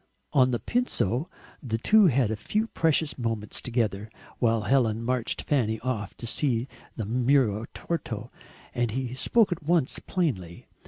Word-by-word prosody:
On 130 -2 +5
the 120 - +1
Pincio 155 - -1 0.3
the 115 -5 -2
two 210 - +5
had 130 -7 +2
a - - 0
few 210 - -1
precious 160 -8 0
moments 115 -3 -3
together, 110 -4 -1 0.3
while 115 -2 +2
Helen 115 -1 +2
marched 125 -1 -1
Fanny 110 -6 +1
off 115 -5 -3
to - - -6
see 120 0 +1 0.3
the 110 - -3
muro 120 -1 +2
Torto, 170 -1 -4 0.4
and 120 -1 0
he 125 +2 -3
spoke 210 - +3
at 175 - -2
once 160 -3 +1
plainly. 95 - -2
125 Hz, 150 wpm, -27 LUFS, 110-145 Hz, 0.4 s, On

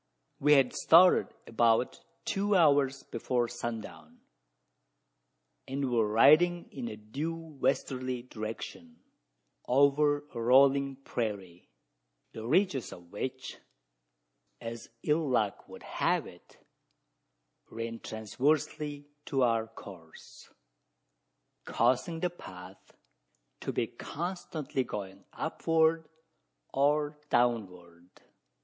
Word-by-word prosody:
We 150 +2 +5
had 135 -3 +4
started 180 +3 +6 0.2
about 115 +1 +2 0.2
two 200 +1 +1
hours 140 -5 +3
before 120 +1 -1
sundown, 120 -2 -7 1.5
and 135 -1 -2
were 115 -3 +2
riding 155 +11 +5
in 245 - -5
a - - -6
due 140 +10 -4
westerly 130 -5 -2
direction, 125 - -8 0.6
over 145 +2 +3
a 115 - -4
"rolling" 135 +3 +4
prairie 100 -9 -5 0.6
the 110 0 -7
ridges 145 - +1
of 85 -1 -13
which, 130 +5 -5 1.0
as 115 0 -7
ill 150 -1 +1
luck 110 -6 0
would - - -11
have - - 0
it, - - -15 1.1
ran 115 0 -5
transversely 145 +6 -2 0.2
to 135 -2 +1
our 115 -2 +2
course: 90 -7 -13 1.1
causing 130 +8 +1
the 180 - 0
path 90 - -13 0.6
to - - -3
be - - 0
constantly 160 -5 -4
going 100 -4 -7
upward 160 0 +1 0.6
or 150 +2 +1
downward. 90 -8 -1
130 Hz, 95 wpm, -30 LUFS, 115-150 Hz, 1.5 s, started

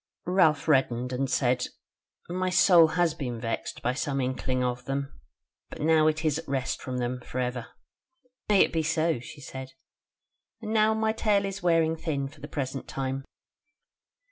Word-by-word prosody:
Ralph 170 -5 +3
reddened 130 -4 +2
and 135 +1 -1
said: 125 -2 +1 0.6
"My 185 +1 -1
soul 180 -2 +6
has 175 -3 +3
been 125 -7 -4
vexed 115 0 -4
by 125 - +1
some 140 +1 -2
inkling 130 0 -1
of 125 0 -2
them; 140 0 -3 0.6
but - - -9
now 155 0 +4
it 155 +1 0
is 155 0 +1
at 165 - -10
rest 135 -2 -2
from 130 -2 -4
them 125 0 -2
for 125 - -7
ever." 125 -2 -2 0.8
"May 205 -2 +6
it - - +3
be 165 - +2
so!" 160 -2 +1
she 135 +5 -11
said: 130 0 -8 0.9
"and 220 -1 -4
now 220 0 +4
my 220 0 +1
tale 205 -3 +2
is 195 0 -5
wearing 165 -2 +3
thin 150 -4 -2
for 145 +1 -15
the 145 - -6
present 135 -2 -4
time. 135 0 -3
145 Hz, 170 wpm, -27 LUFS, 130-165 Hz, 0.9 s, soul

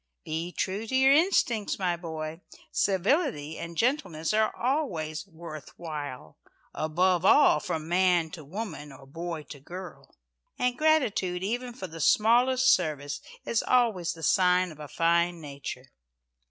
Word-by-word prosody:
"Be 165 +3 -3
true 200 +5 -3
to 260 - -2
your 265 +1 +6
instincts, 280 - +2
my 180 -3 0
boy. 160 -1 -6 0.3
Civility 195 - 0
and 170 0 -7
gentleness 220 - 0
are 215 0 +3
always 200 - -2
'worth 160 -4 -10
while.' 145 - -7 0.3
Above 175 +3 +1
all, 190 - +6
from 155 +1 -4
man 175 -2 +2
to 155 - -9
woman, 160 -3 -6
or 135 0 -14
boy 165 +2 -5
to 145 - -11
girl. 180 +5 -10 0.4
And 250 0 +1
gratitude 230 - +1
even 245 +5 -2
for 220 - -6
the 165 -2 -8
smallest 250 - +4
service 145 - -2 0.2
is 230 - +1
always 215 -9 +2
the 165 - -11
sign 180 +1 +3
of 155 - -14
a 150 - -7
fine 170 +2 +1
nature. 140 -3 -8
175 Hz, 140 wpm, -28 LUFS, 155-220 Hz, 0.4 s, your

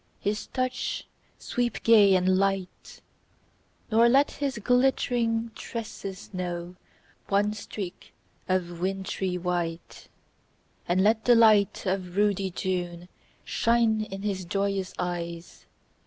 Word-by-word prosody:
His 210 +1 -2
touch 255 -1 -2 0.3
sweep 245 -1 -2
gay 210 -4 +6
and 185 0 +3
light; 195 -2 -2 0.9
Nor 230 +2 +5
let 275 +4 +4
his 275 -4 -3
glittering 235 -1 +1
tresses 205 -6 -7
know 175 -1 -4 0.5
One 205 +1 +2
streak 200 -3 -7 0.4
of 175 -2 -1
wintry 190 0 -2
white. 175 -2 -4 0.8
And 185 +2 +2
let 220 +1 +2
the 245 - +6
light 215 -4 +4
of 185 -1 -2
ruddy 200 -2 +2
June 175 -1 -3 0.4
Shine 230 -2 +2
in 195 -1 -7
his 195 -3 -2
joyous 195 +1 -1
eyes. 170 -1 -5
195 Hz, 110 wpm, -27 LUFS, 180-225 Hz, 0.9 s, gay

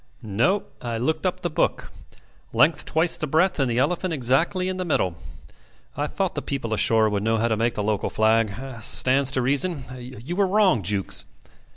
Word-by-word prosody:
"No. 120 - +1 0.2
I 120 -1 -3
looked 130 +8 -1
up - - -3
the - - -2
book. - - -1 0.6
Length 155 +2 +3
twice 160 +2 +2
the 155 - -3
breadth 165 +4 +1
and 135 -2 +1
the 120 - -1
elephant 170 +6 0
exactly 150 +8 +1
in 185 0 -3
the 185 - -2
middle. 95 - 0 0.8
I - - -2
thought - - -2
the - - -4
people 125 -5 -4
ashore 110 0 +3
would 105 -1 -1
know 115 +2 +1
how 115 +2 0
to 110 - +1
make 115 +1 0
the 105 - -2
local 105 -1 -1
flag. 110 0 +2 0.3
Stands 130 +5 +4
to 130 - 0
reason. 140 +3 0
You 125 +5 -8
were 200 0 +2
wrong, 190 - +3
Jukes. 95 +1 -2
130 Hz, 190 wpm, -24 LUFS, 110-165 Hz, 0.8 s, Stands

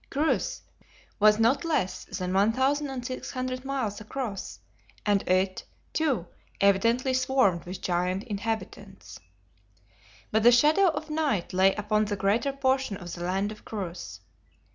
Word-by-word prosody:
Chryse 315 - 0 0.6
was 210 0 +6
not 235 +7 +3
less 310 - -1
than 185 -1 -4
1,600 255 +3 -1
miles 260 -7 -3
across, 215 -2 -5 0.5
and 205 -2 +3
it, 185 +1 +1 0.3
too, 275 - 0 0.3
evidently 230 +7 +3
swarmed 255 -9 +2
with 180 +2 -7
giant 180 +2 -1
inhabitants. 205 -2 -5 1.1
But 220 - +2
the 240 +2 +7
shadow 300 +10 +5
of 315 -2 -2
night 290 - -1
lay 190 +1 +4
upon 210 +1 +1
the 205 0 -2
greater 215 +8 +1
portion 265 -5 0
of 175 -3 -8
the 175 - -6
land 195 +3 -1
of 215 - -11
Chryse. 175 - -6
215 Hz, 125 wpm, -27 LUFS, 195-265 Hz, 1.1 s, the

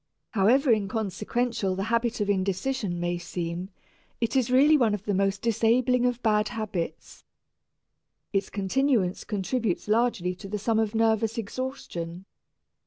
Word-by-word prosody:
However 245 +6 +4
inconsequential 215 0 -1
the 195 - -2
habit 230 0 +1
of 205 - 0
indecision 195 +1 -1
may 175 0 -1
seem, 175 +1 -4 0.5
it 230 0 -1
is 255 -3 +2
really 280 +5 +6
one 230 -7 +3
of 205 - -8
the 205 - 0
most 195 +1 0
disabling 235 +2 +3
of 245 0 -2
bad 210 -1 +3
habits. 210 -6 -5 1.1
Its 195 -1 0
continuance 205 -1 +1
contributes 210 -1 -2
largely 215 -5 +1
to 195 - -9
the 210 +2 -3
sum 220 +2 +1
of 220 0 0
nervous 225 0 +2
exhaustion. 195 -7 -5
215 Hz, 135 wpm, -27 LUFS, 190-240 Hz, 1.1 s, really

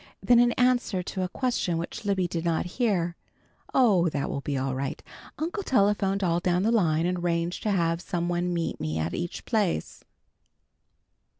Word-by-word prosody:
Then 245 -1 +5
in 240 0 +5
answer 245 -6 +1
to 190 - -4
a 185 - -1
question 235 -8 -1
which 190 +6 -5
Libby 190 -3 +1
did 165 -1 -3
not 170 0 0
hear, 180 -4 0 0.6
"Oh, 200 -10 +4
that 145 -2 -2
will 140 - -3
be 140 0 -2
all 135 0 -1
right. 135 +1 -3 0.4
Uncle 340 +6 -2
telephoned 200 - +2
all 170 -1 +2
down 180 +1 +1
the 225 - +2
line 165 -8 +2
and 180 0 0
arranged 170 0 -1
to 215 - -1
have 170 -3 +1
some 175 -1 -2
one 175 0 0
meet 170 -1 -2
me 80 0 -2
at 80 +1 -2
each 175 0 -4
place." 205 - -1
180 Hz, 180 wpm, -27 LUFS, 170-210 Hz, 0.6 s, Then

